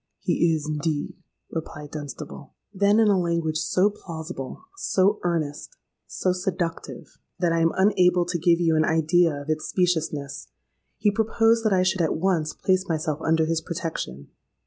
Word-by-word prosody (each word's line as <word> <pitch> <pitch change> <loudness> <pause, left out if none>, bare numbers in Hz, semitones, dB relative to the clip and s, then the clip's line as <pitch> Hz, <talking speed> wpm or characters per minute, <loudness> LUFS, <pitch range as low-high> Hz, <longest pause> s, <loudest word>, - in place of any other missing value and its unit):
—'He 165 -1 +2
is 155 -1 -4
indeed,' 150 0 -3 0.3
replied 150 -2 -6
Dunstable. 145 0 -8 0.2
"Then, 200 +2 +3
in 225 - +5
a 200 -2 +4
language 170 -3 0
so 190 +5 +2
plausible—so 185 - -2
earnest—so 170 - -3
seductive, 180 -2 -4 0.2
that 175 -2 +1
I 165 - +2
am 165 0 +3
unable 180 -3 +3
to 175 0 -2
give 170 +1 +3
you 165 -2 +2
an 155 - +3
idea 165 +2 +3
of 145 - -10
its 155 0 -2
speciousness, 160 -6 -1 0.5
he 210 - +2
proposed 225 +1 +2
that 215 - +3
I 185 -1 +3
should 185 0 +1
at 160 - +1
once 165 -3 +1
place 185 0 0
myself 155 -1 -1
under 160 0 +2
his 160 0 0
protection. 160 - -5
170 Hz, 150 wpm, -25 LUFS, 155-185 Hz, 0.5 s, in